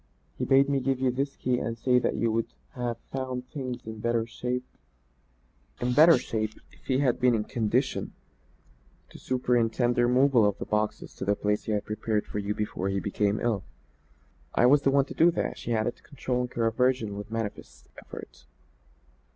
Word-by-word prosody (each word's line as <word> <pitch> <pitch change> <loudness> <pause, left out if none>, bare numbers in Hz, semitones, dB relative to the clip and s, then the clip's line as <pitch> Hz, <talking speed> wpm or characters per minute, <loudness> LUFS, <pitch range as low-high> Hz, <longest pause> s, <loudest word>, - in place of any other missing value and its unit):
He - - -2
bade 135 +1 +5
me 140 -1 +1
give 135 0 0
you 130 -1 +2
this 135 +2 -2
key 125 -1 0
and 115 0 -3
say 125 +1 +3
that - - 0
you 115 -1 +1
would 115 +1 0 0.2
have 120 -3 -3
found 130 -1 -4
things 130 -4 -5
in 110 0 -7
better 115 0 0
shape 125 +2 -3 1.1
if 125 -5 +2
he 130 - +2
had 130 -3 +2
been 125 -1 +4
in 105 - 0
condition 120 +3 -1 1.0
to - - -12
superintend 120 -1 +1
the 120 0 +3
removal 125 -1 +4
of 105 -1 +2
the - - -5
boxes 105 0 -2
to - - -4
the 100 +1 +2
place 105 +1 -1
he 110 - -1
had 105 - -1
prepared 105 0 -1
for 105 - -4
you 105 +1 -2
before 100 -2 -2
he 95 0 0
became 100 +1 0
ill. 110 -5 0 0.9
I - - +5
was 140 +3 +6
the 140 - +3
one 135 0 +3
to - - -8
do 165 - +5
that," 175 - -2
she 120 - -2
added, 110 +2 -1
controlling 125 -3 -3
her 115 - +1
aversion 115 -2 +1
with 105 +1 -7
manifest 115 -2 -6 0.2
effort. - - -11
120 Hz, 180 wpm, -27 LUFS, 110-130 Hz, 1.1 s, was